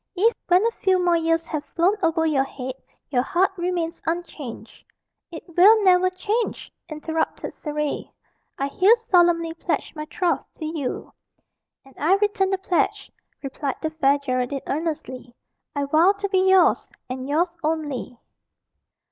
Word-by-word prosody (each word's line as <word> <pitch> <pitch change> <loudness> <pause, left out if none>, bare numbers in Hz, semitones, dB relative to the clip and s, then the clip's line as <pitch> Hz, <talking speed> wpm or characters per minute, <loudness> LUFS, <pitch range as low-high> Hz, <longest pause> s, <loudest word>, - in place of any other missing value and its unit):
If, 445 +6 +3
when 365 +4 +4
a 465 - +2
few 380 -4 +1
more 355 -1 +2
years 330 0 +1
have 305 -2 -4
flown 345 +5 +1
over 330 -1 +1
your 290 -4 +2
head, 260 -1 -6 0.4
your 250 -3 +3
heart 370 +8 +1
remains 345 -2 -2
unchanged." 325 -7 -5 0.5
"It 325 - -8
will 415 +4 +7
never 370 -1 +5
change!" 420 +5 -3 0.2
interrupted 320 +1 -3
Surrey. 300 -1 -4 0.5
"I 275 - -1
here 385 +10 +5
solemnly 345 -7 +2
pledge 330 - -3
my 305 0 -5
troth 340 +2 -1
to 315 - -7
you." 310 -4 -4 0.7
"And 270 - -18
I 340 +6 +4
return 400 -1 +1
the 385 - 0
pledge," 370 -2 -1 0.3
replied 275 0 -3
the 315 - -1
Fair 285 -3 +2
Geraldine 260 -1 -2
earnestly. 270 -5 -4 0.4
"I 285 0 0
vow 320 +7 +4
to 400 0 -3
be 380 -1 +3
yours, 375 -2 +4 0.2
and 255 +1 -5
yours 330 +5 +2
only." 300 -6 -3
330 Hz, 145 wpm, -23 LUFS, 290-370 Hz, 0.7 s, will